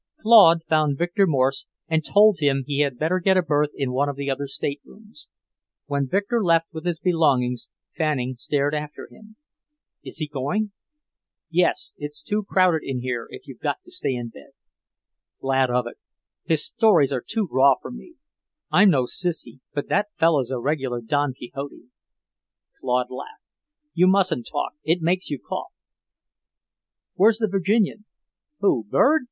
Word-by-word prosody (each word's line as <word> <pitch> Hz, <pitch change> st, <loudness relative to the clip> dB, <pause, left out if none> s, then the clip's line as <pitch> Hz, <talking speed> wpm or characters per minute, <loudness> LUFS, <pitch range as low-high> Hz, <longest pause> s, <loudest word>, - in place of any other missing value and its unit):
Claude 200 Hz, -8 st, +7 dB
found 155 Hz, -3 st, +2 dB
Victor 175 Hz, +4 st, +1 dB
Morse 135 Hz, -3 st, 0 dB, 0.2 s
and 160 Hz, -1 st, 0 dB
told 210 Hz, +2 st, +5 dB
him 140 Hz, -2 st, +1 dB
he 140 Hz, 0 st, -2 dB
had 140 Hz, -4 st, +1 dB
better 165 Hz, +7 st, 0 dB
get 190 Hz, +1 st, +3 dB
a 185 Hz, -, +3 dB
berth 150 Hz, -2 st, +1 dB
in 135 Hz, -3 st, -2 dB
one 140 Hz, +3 st, 0 dB
of 140 Hz, -, -4 dB
the 140 Hz, 0 st, -3 dB
other 140 Hz, +1 st, -3 dB
staterooms. 205 Hz, -, -7 dB, 0.6 s
When 140 Hz, -1 st, -1 dB
Victor 205 Hz, -, 0 dB
left 165 Hz, -2 st, +2 dB
with 160 Hz, +2 st, -6 dB
his 170 Hz, -2 st, -1 dB
belongings, 140 Hz, -9 st, +1 dB, 0.3 s
Fanning 140 Hz, -5 st, -1 dB
stared 140 Hz, +4 st, -1 dB
after 150 Hz, 0 st, -5 dB
him. 215 Hz, 0 st, -17 dB, 0.7 s
"Is -, -, -5 dB
he 155 Hz, -1 st, -2 dB
going?" 150 Hz, +10 st, -2 dB, 0.8 s
"Yes. 175 Hz, +1 st, +1 dB
It's 145 Hz, 0 st, -7 dB
too 210 Hz, +1 st, -1 dB
crowded 185 Hz, -5 st, +2 dB
in 130 Hz, -2 st, -4 dB
here, 125 Hz, -2 st, -3 dB
if 400 Hz, -, -11 dB
you've -, -, -12 dB
got 375 Hz, -, -3 dB
to 355 Hz, -, -16 dB
stay 355 Hz, -, -2 dB
in 120 Hz, -1 st, -5 dB
bed." 70 Hz, -, -16 dB, 0.9 s
"Glad 135 Hz, -1 st, +1 dB
of 125 Hz, 0 st, 0 dB
it. 120 Hz, -, -9 dB, 0.5 s
His 160 Hz, -2 st, +1 dB
stories 175 Hz, -, +3 dB
are 125 Hz, -, -2 dB
too 220 Hz, -3 st, -1 dB
raw 135 Hz, +1 st, +5 dB
for -, -, -9 dB
me. 330 Hz, +8 st, -12 dB, 0.6 s
I'm 205 Hz, +2 st, +6 dB
no 135 Hz, -7 st, +3 dB
sissy, 165 Hz, +1 st, -3 dB
but 145 Hz, -1 st, -4 dB
that 205 Hz, +1 st, +1 dB
fellow's 160 Hz, -7 st, +2 dB
a 130 Hz, -, -2 dB
regular 130 Hz, -2 st, -2 dB
Don 145 Hz, +4 st, 0 dB
Quixote." 130 Hz, 0 st, -9 dB, 0.9 s
Claude 125 Hz, -1 st, -1 dB
laughed. 440 Hz, -, -9 dB, 0.5 s
"You 180 Hz, +2 st, +4 dB
mustn't 185 Hz, -10 st, +2 dB
talk. 145 Hz, -, -2 dB
It 165 Hz, +3 st, +1 dB
makes 180 Hz, +3 st, 0 dB
you 145 Hz, -, -2 dB
cough." -, -, -6 dB, 1.4 s
"Where's 215 Hz, +3 st, +4 dB
the 220 Hz, -1 st, 0 dB
Virginian?" 200 Hz, +2 st, 0 dB, 0.6 s
"Who, 125 Hz, -, +2 dB
Bird?" 310 Hz, -, +4 dB
150 Hz, 160 wpm, -23 LUFS, 135-190 Hz, 1.4 s, Claude